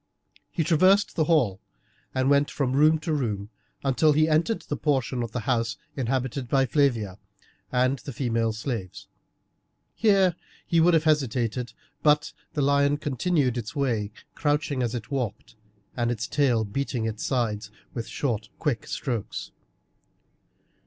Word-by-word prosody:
He 165 - -1
traversed 185 +6 +4
the 160 - +2
hall 125 - +2 0.6
and 130 0 +2
went 140 +1 +4
from 130 -3 -1
room 155 +3 +5
to 160 - -1
room 105 -7 -2 0.3
until 140 +3 +3
he 155 +2 +3
entered 160 +8 +1
the 145 - -3
portion 130 -4 0
of 115 -2 -4
the 125 - -3
house 115 -2 0 0.2
inhabited 130 0 -2
by 135 0 +3
Flavia 115 -8 +1 0.5
and 130 +1 +2
the 140 - -7
female 115 -3 0
slaves. 110 -4 -5 0.9
Here 195 -5 +3 0.3
he 170 - +2
would 170 +1 +5
have 160 - +3
hesitated, 125 -5 0 0.3
but 150 0 +3 0.2
the 145 - 0
lion 140 +1 +3
continued 145 -3 0
its 110 -2 -7
way, 115 -7 0 0.2
crouching 145 -3 0
as 120 0 -1
it 120 +3 -6
walked, 125 -3 -3 0.4
with 120 -1 0
its 115 -2 -2
tail 125 -6 +2
beating 120 +1 -2
its 110 -1 -3
sides 110 -5 -1 0.2
with 115 -2 -4
short 110 -6 -2
quick 130 -9 -2
strokes. 120 -7 -4
130 Hz, 145 wpm, -26 LUFS, 115-150 Hz, 0.9 s, room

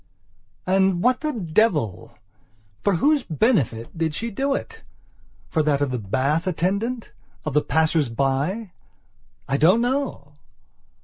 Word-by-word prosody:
And, 190 -1 +2
what 250 +1 +3
the 305 -1 -1
devil! 170 - 0 0.7
For 200 -2 +2
whose 290 - +3
benefit 155 - 0
did 160 -2 -1
she 230 +5 -3
do 275 +6 0
it? 450 +7 -6 0.7
For 160 - +2
that 150 -2 +1
of 145 -2 0
the 125 - -2
bath 140 - 0
attendant? 200 +7 -1 0.3
of 155 - -2
the 150 - +4
passers 160 -3 +1
by? 140 - -1 0.8
I 135 - +1
don't 180 +10 +5
know. 245 - -2
175 Hz, 130 wpm, -23 LUFS, 145-230 Hz, 0.8 s, don't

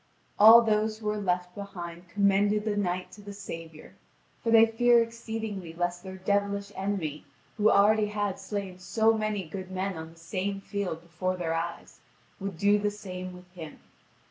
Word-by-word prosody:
All 225 +3 +10
those 215 0 +1
who 220 - -12
were 210 0 0
left 180 -2 -1
behind 175 -3 -8
commended 205 +2 +2
the 215 -2 0
knight 185 -2 -2
to 205 - -13
the 205 0 -9
Saviour, 165 -5 -9 0.5
for 230 - 0
they 225 0 +8
fear 235 +1 +4
exceedingly 220 -6 -4
lest 175 0 -2
their 190 0 -8
devilish 200 +1 -1
enemy, 190 -7 -3 0.3
who 215 0 +4
already 210 +1 +4
had 205 -2 -2
slain 195 -3 -5
so 220 +4 +2
many 215 -4 -2
good 185 +2 -7
men 190 +1 -2
on 160 0 -7
the 165 - -20
same 190 +4 -3
field 195 -5 -4
before 185 +2 -3
their 165 -2 -1
eyes, 170 +1 -5 0.4
would 195 -3 -5
do 205 +3 +4
the 205 0 +1
same 185 -3 -7
with 180 0 -15
him. 165 -4 -9
200 Hz, 170 wpm, -28 LUFS, 180-210 Hz, 0.5 s, All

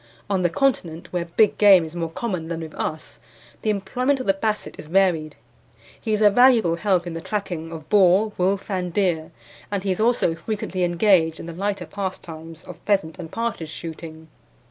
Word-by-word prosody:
On 190 -2 +1
the 175 - +2
Continent, 170 -7 -1
where 175 -1 -1
big 205 +5 +2
game 195 -5 +7
is 160 +2 -10
more 165 -1 -2
common 180 -2 -4
than 165 0 -4
with 160 -1 -8
us, 155 0 -5 0.4
the 220 - -1
employment 250 +7 0
of 255 - -4
the 195 - +3
Basset 215 +2 -2
is - - -9
varied. 165 -4 +2 0.7
He 220 - -3
is 215 0 +2
a 205 - +7
valuable 230 -7 +5
help 185 -2 +1
in 175 - -5
the 165 - -5
tracking 175 -5 -4
of 160 -2 -8
boar, 200 +2 +4
wolf, 195 +3 0
and 180 -2 -2
deer, 170 -4 0 0.4
and 200 -2 -2
he 195 - 0
is 185 - -2
also 225 -6 +2
frequently 185 +1 -3
engaged 175 -2 +3
in - - -7
the 170 - -7
lighter 200 +3 -2
pastimes 165 -5 -7
of - - -11
pheasant 190 -4 0
and 165 -2 -7
partridge 230 -9 -3
shooting. 160 -1 -8
185 Hz, 190 wpm, -23 LUFS, 165-205 Hz, 0.7 s, game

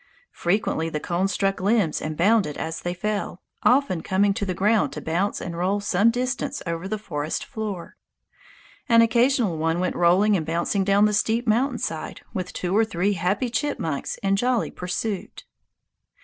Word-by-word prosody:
Frequently 175 -3 0
the 150 - -3
cones 180 +4 -1
struck 195 -1 0
limbs 200 -4 +1
and 155 0 -4
bounded 195 -4 +2
as 160 0 -4
they 175 0 -3
fell, 205 0 -3 0.2
often 250 - +3
coming 200 +3 +2
to 200 0 -3
the 185 - -2
ground 210 +3 +2
to - - -5
bounce 175 +6 -1
and 170 -2 -5
roll 185 +4 0
some 200 +2 +3
distance 255 +3 -2
over 170 +2 -3
the 215 +2 -2
forest 155 -7 -4
floor. 205 -6 -6 0.9
An 230 0 +7
occasional 235 - +2
one 165 +2 0
went 180 0 -1
rolling 185 +5 +4
and 170 - 0
bouncing 170 +5 0
down 200 +2 +4
the 210 - +1
steep 225 +3 +1
mountain 245 +3 +2
side 160 -7 -4
with 185 -4 -4
two 180 +1 -2
or 220 - +5
three 200 -1 0
happy 195 +7 -1
chipmunks 230 - -2
in 195 0 +2
jolly 245 +1 +1
pursuit. 185 +3 -4
195 Hz, 170 wpm, -24 LUFS, 175-220 Hz, 0.9 s, An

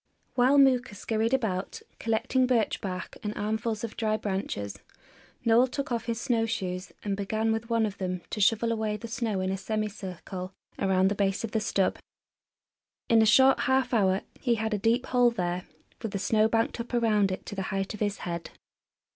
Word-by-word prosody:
While 255 +3 +4
Mooka 260 -4 +4
scurried 225 +2 -1
about, 215 -8 -1 0.2
collecting 230 +3 +1
birch 235 -4 +1
bark 185 -2 -5
and 210 0 -4
armfuls 220 +1 -2
of 230 - -5
dry 215 -1 0
branches, 190 - -3 0.7
Noel 235 +2 +5
took 275 +1 -4
off 235 -1 -1
his 230 -1 -2
snow 225 -1 +1
shoes 185 -4 -3
and 200 -1 -1
began 215 +3 0
with 225 +1 -2
one 230 -1 +2
of 205 -2 -5
them 180 -2 -3
to 210 - -2
shovel 225 +3 +3
away 220 -2 -1
the 230 - -7
snow 225 -4 -2
in 185 0 -1
a 195 - -1
semicircle 195 -3 -4 0.3
around 190 -1 +3
the - - 0
base 195 0 0
of 225 - -3
the 220 - +1
stub. 200 -3 0 1.1
In 230 -1 +6
a 220 - +4
short 265 +5 +6
half 260 -1 +1
hour 195 -3 +3 0.2
he 240 -3 +2
had 220 0 -2
a 210 - 0
deep 230 +5 +2
hole 245 -1 +4
there, 180 -5 -3 0.3
with 225 -3 -4
the - - 0
snow 215 +2 +3
banked 225 +1 0
up 235 +1 -4
around 210 -4 +3
it 185 - -5
to - - -7
the 195 - -3
height 195 +1 -2
of 210 - -8
his 205 -1 0
head. 170 -1 -4
220 Hz, 195 wpm, -28 LUFS, 195-230 Hz, 1.1 s, In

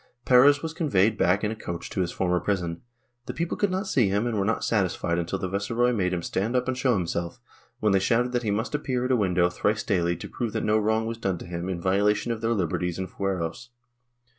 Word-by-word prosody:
Perez 140 +4 +6
was 160 0 -3
conveyed 115 - +2
back 100 0 +2
in 105 - 0
a - - -4
coach 85 -5 -6
to 95 - -1
his 90 -1 -1
former 90 -1 0
prison; 90 -3 -2 0.5
the - - -5
people 170 +1 -2
could 205 - +1
not 190 +2 -2
see 125 - +2
him 100 +4 0
and 120 -2 -1
were 100 - +1
not 110 - 0
satisfied 90 -5 0
until 85 +3 -2
the 95 - -3
viceroy 115 +6 0
made 95 -5 0
him 90 -2 -2
stand 110 +9 -1
up 125 0 +1
and 130 - 0
show 130 0 +2
himself, 85 -2 -3 0.4
when 105 - +3
they 95 - +4
shouted 120 +5 +1
that 120 -1 0
he 110 - -2
must 110 +6 -1
appear 130 -4 -1
at 130 - 0
a - - +5
window 90 -5 +2
thrice 105 +4 -1
daily 85 -4 +1
to - - -8
prove 120 -4 -4
that 110 - -1
no 110 +1 +3
wrong 110 +1 +1
was 115 0 -4
done 95 -5 -1
him 85 +1 -5
in 90 -2 -3
violation 100 +5 +1
of 115 -1 -4
their 115 +1 +1
liberties 90 -2 -1
and 95 -1 -5
fueros. 95 +4 -3
105 Hz, 240 wpm, -26 LUFS, 90-120 Hz, 0.5 s, Perez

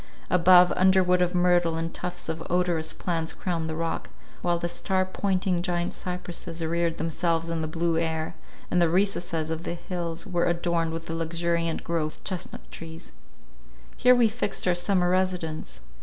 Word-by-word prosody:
Above, 180 0 +7
underwood 185 -1 +4
of 180 0 +1
myrtle 175 -2 +3
and 165 0 -3
tufts 180 -1 -4
of 160 0 -3
odorous 175 -3 +1
plants 165 -2 -2
crowned 165 -3 -2
the 160 - -3
rock, 165 0 -3 0.3
while 175 -1 +1
the 170 - -2
star 185 +2 0
pointing 185 -2 0
giant 175 0 -1
cypresses 180 -2 -5
reared 170 0 0
themselves 165 0 0
in 165 -1 -1
the 155 - -2
blue 165 +1 0
air, 160 -1 -1 0.4
and 180 - +3
the 170 - +4
recesses 175 -3 0
of 160 0 -2
the 170 - -3
hills 170 -1 -4
were 175 -4 0
adorned 170 -1 0
with 165 0 -5
the 165 - -4
luxuriant 165 0 -1
growth 160 -2 -2
of - - -27
chestnut 185 -1 -5
trees. 165 0 -9 0.8
Here 250 0 +6
we 240 -2 +5
fixed 215 -4 -2
our 180 - +4
summer 180 0 +1
residence. 180 - -1
170 Hz, 170 wpm, -26 LUFS, 165-180 Hz, 0.8 s, Above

